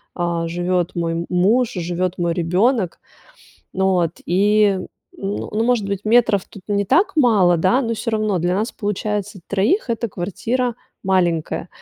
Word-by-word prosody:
а, 170 -1 -1
живет 175 +1 -1
мой 170 0 -2
муж, 215 +7 +2
живет 180 0 -2
мой 170 -1 0
ребенок. 185 +4 +1 0.7
Ну 190 0 0
вот, 170 -2 0
и, 200 +1 +3 0.4
ну 200 +1 -4
ну, 220 +2 0
может 240 -4 +1
быть, 200 -1 -2
метров 225 -3 +3
тут 200 - -13
не 200 -1 +1
так 340 - +2
мало, 205 - +4
да, 185 +10 +2
но 230 -2 -1
всё 230 +1 -3
равно 215 -4 0
для 175 +2 0
нас 215 +4 -1
получается 205 -1 -3
3 215 - +1
эта 230 0 -1
квартира 230 +7 -2 0.3
маленькая. 175 -4 0
195 Hz, 150 wpm, -20 LUFS, 175-220 Hz, 0.7 s, мало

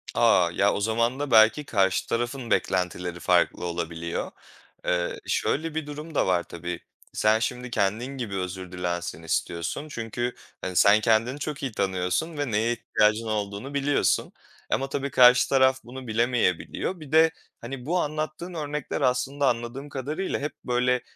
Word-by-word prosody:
A! 85 -2 +4
Ya, 100 +3 +2
o 105 - -2
zaman 115 +4 +1
da 145 -3 -3
belki 110 +6 +6
karşı 95 -6 +1
tarafın 120 +1 -2
beklentileri 90 -1 0
farklı 90 - +2
olabiliyor. 85 -1 -3 0.5
Eee, 90 -1 0
şöyle, 160 +1 0
bir 160 -2 -2
durum 150 +2 -8
da - - +2
var 90 -2 +2
tabii, 85 0 -6 0.3
sen 110 +1 +3
şimdi 125 +1 -3
kendin 120 +5 -1
gibi 105 -6 -4
özür 90 -1 -4
dilensin 85 -2 -3
istiyorsun 85 - -2
çünkü, 120 0 -3 0.3
hani, 95 - -4
sen 100 +3 +6
kendini 115 +5 +2
çok 150 -2 -4
iyi 135 - -1
tanıyorsun 100 - -1
ve 145 -4 -2
neye 110 +3 +1
ihtiyacın 110 -1 +1
olduğunu 105 +5 -3
biliyorsun 140 0 +1 0.4
ama 135 0 0
tabii 140 0 -2
karşı 125 0 +6
taraf 130 -1 +4
bunu 130 +1 -9
bilemeyebiliyor. 120 - 0
Bir 150 -2 -11
de, 160 +1 +6 0.3
hani, 125 +1 -7
bu 175 +3 +1
anlattığın 155 +4 -3
örnekler 150 -3 -3
aslında 135 +2 +1
anladığım 120 +4 -2
kadarıyla 150 +8 -3
hep 145 +2 -3
böyle 125 0 +2
120 Hz, 155 wpm, -26 LUFS, 95-140 Hz, 0.5 s, belki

